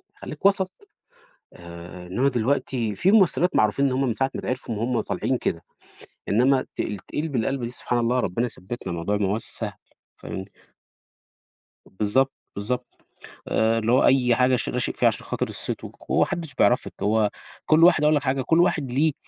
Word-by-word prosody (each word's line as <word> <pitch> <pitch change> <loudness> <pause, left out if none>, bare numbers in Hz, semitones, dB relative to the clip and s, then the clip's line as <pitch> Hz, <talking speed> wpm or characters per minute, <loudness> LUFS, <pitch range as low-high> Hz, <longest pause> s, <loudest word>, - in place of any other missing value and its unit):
خليك - - -10
وَسَط. 190 -2 +3 0.8
آآ 85 +1 -11
إنما 125 +10 +1
دلوقتي 125 -2 -1
في 185 - +2
ممثلات 185 -4 +3
معروفين 110 +6 +2
إن 130 - 0
هُم 135 +1 0
من 115 - -1
ساعة 135 +2 0
ما - - -4
اتعرفوا 125 -3 -4
وهُم 115 +2 -1
طالعين - - -2
كده، - - -3 0.7
إنما 130 +5 +3
ت - - -20
تتقلب 140 - -4
القلبة 130 +3 -1
دي، 120 - -4
سبحان 120 -1 -2
الله! 120 +2 +1
ربنا 115 +6 -1
يثبتنا، 100 -3 -2
الموضوع 85 +5 -2
ما 105 -1 0
هواش 105 +4 -1
سهل، - - 0 0.4
فاهمني؟ 95 - -7 1.4
بالضبط، 110 +8 +1 0.2
بالضبط. 125 +5 -1 0.6
آآ 115 +1 +1
اللي 115 +1 0
هو 130 - +4
أي 125 -3 +4
حاجة 125 0 +3
ش - - 0
راشق 125 -1 +3
فيها - - +3
عشان - - 0
خاطر - - -2
الصيت - - -2
والقو - - -7
هو - - +3
ما - - +4
حدش 160 -6 -5
بيعرفِك، 125 - +2
هو 105 0 +2 0.4
كل 160 +2 +5
واحد 175 -4 +5
أقول 150 +1 +4
لك 145 - 0
حاجة، 135 -1 0
كل 165 +6 +2
واحد 150 -7 +1
ليه 150 +4 +2
125 Hz, 180 wpm, -24 LUFS, 110-140 Hz, 1.4 s, كل